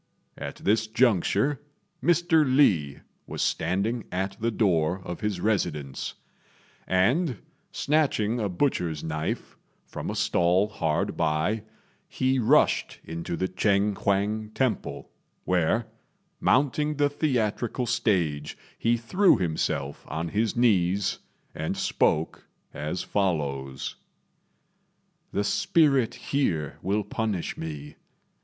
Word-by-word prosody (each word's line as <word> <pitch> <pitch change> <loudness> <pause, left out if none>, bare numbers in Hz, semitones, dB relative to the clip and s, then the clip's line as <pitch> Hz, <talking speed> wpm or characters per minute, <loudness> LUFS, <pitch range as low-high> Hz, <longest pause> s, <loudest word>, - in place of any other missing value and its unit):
At - - -6
this 110 +2 +1
juncture 120 - +2 0.4
Mr. 170 -2 +4
Li 105 - +3 0.3
was - - -2
standing 100 +8 0
at 95 +1 -2
the 115 - +1
door 90 -6 +1
of 90 - -6
his 105 -4 -1
residence; 80 -10 -1 0.7
and 120 - +2 0.3
snatching 135 -7 +1
a 105 -3 -1
butcher's 90 - -1
knife 75 -1 -3 0.3
from - - -6
a - - -3
stall 90 +4 +2
hard 80 -7 -1
by, 80 +7 0 0.5
he 130 0 +1
rushed 115 - +3
into 85 +1 -5
the 95 - 0
Ch'êng 100 +2 +1
huang 105 +3 0
temple, 130 -3 -2 0.3
where, 90 +6 +2 0.5
mounting 150 +3 +2
the 145 0 +3
theatrical 125 -4 -1
stage, 85 -11 0 0.2
he 120 +1 +2
threw 180 - +3
himself 75 -5 -2
on 80 +2 -3
his 110 +5 0
knees, 100 -5 +2 0.3
and 80 +1 -3
spoke 80 +1 0 0.3
as 75 +4 -3
follows: 70 -9 -2 1.3
"The 100 - 0
spirit 145 - +2
here 85 - -1
will 105 +2 0
punish 105 -4 -2
me. 75 -2 -7
100 Hz, 110 wpm, -26 LUFS, 85-120 Hz, 1.3 s, Mr